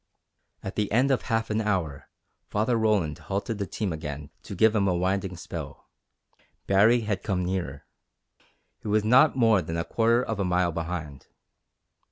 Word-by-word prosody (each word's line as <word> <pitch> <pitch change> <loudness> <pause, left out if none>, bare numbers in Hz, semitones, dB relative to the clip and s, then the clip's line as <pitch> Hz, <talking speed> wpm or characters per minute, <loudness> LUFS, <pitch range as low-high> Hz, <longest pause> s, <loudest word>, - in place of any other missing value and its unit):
At 95 - -6
the 105 -1 -1
end 130 +5 +3
of 130 - +2
half 115 -2 -1
an 110 +1 +1
hour 90 -10 -2 0.4
Father 110 +4 +1
Roland 105 -9 +1
halted 100 +3 -3
the 100 - -2
team 100 -3 -3
again 75 -2 -6
to - - -8
give 110 0 +4
him 100 -2 +2
a 90 - +2
"winding" 95 0 -1
spell. - - -8 0.7
Baree 110 +5 +4
had 105 -3 -2
come 90 -3 -1
nearer. 90 -7 -3 0.9
He - - -9
was 105 0 +2
not 130 +8 +5
more 115 -6 +4
than 80 0 -4
a 85 - 0
quarter 115 +2 +2
of 110 -4 -4
a - - +1
mile 90 -1 +1
behind. 80 -4 -5
100 Hz, 170 wpm, -26 LUFS, 90-110 Hz, 0.9 s, not